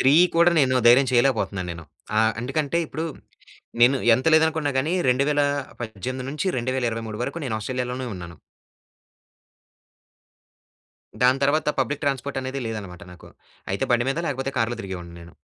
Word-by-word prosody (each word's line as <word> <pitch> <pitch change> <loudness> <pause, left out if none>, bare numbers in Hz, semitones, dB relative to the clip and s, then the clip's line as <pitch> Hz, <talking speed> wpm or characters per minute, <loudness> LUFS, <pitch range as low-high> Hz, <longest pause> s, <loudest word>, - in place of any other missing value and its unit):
3 135 +2 +5 0.2
కూడా 170 +1 +6
నేను 130 -1 +2
ధైర్యం 130 +3 +7
చేయలేకపోతున్నాను 115 -7 +1
నేను. 85 -1 -10 0.3
ఆహ్, 110 0 +3
ఎందుకంటే 145 +5 -1
ఇప్పుడు 160 +2 -4 0.8
నేను 125 +3 +6 0.2
ఎంత 130 +3 -2
లేదనుకున్నాగాని 160 -2 +2 0.2
2018-2023 130 - -1
వరకు 170 - -4
నేను 125 -5 -2
ఆస్ట్రేలియా‌లోనే 125 +3 -3
ఉన్నాను. 85 -3 -9 2.8
దాని 130 +2 +4
తర్వాత 150 +3 +2
పబ్లిక్ 140 +3 -2
ట్రాన్స్‌ఫోర్ట్ 140 0 -2
అనేది 130 +1 -4
లేదనమాట 100 -6 -6
నాకు. 90 - -14 0.4
అయితే 100 - -1
బండి 120 0 +2
మీద 135 - -2
లేకపోతే 135 0 -2
కార్‌లో 115 +1 0
తిరిగేవాడిని 90 -3 -7
నేను. 85 0 -13
130 Hz, 120 wpm, -24 LUFS, 110-140 Hz, 2.8 s, ధైర్యం